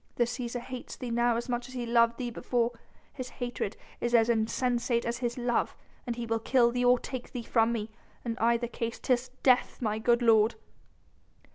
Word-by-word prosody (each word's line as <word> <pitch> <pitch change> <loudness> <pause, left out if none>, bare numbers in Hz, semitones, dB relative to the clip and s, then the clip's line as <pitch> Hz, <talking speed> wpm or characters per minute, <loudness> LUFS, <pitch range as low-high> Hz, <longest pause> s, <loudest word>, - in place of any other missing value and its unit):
The 240 - +3
Cæsar 240 0 -3
hates 255 0 -7
thee 245 -2 -5
now 235 0 +2
as 235 +2 -3
much 240 0 -2
as 260 - -11
he 245 -1 -2
loved 235 0 +3
thee 245 -2 -3
before... 240 0 0 0.4
his 255 -3 -6
hatred 240 -5 -4 0.2
is 240 0 +1
as 230 0 +5
insensate 235 +1 +1
as 235 0 -2
his 240 0 -2
love.... 240 -1 0 0.4
He 235 0 -3
will 225 0 0
kill 235 +1 +3
thee 245 +1 0
or 245 0 +6
take 255 0 -7
thee 245 -2 -4
from 225 0 +2
me.... 220 -2 -3 0.3
In 230 -1 -1
either 235 +1 +2
case 230 -1 -4
'tis 255 0 0
death, 255 -2 +3
my 215 -3 -1
good 240 +2 +3
lord...." 220 -1 +5
240 Hz, 190 wpm, -29 LUFS, 230-245 Hz, 0.4 s, or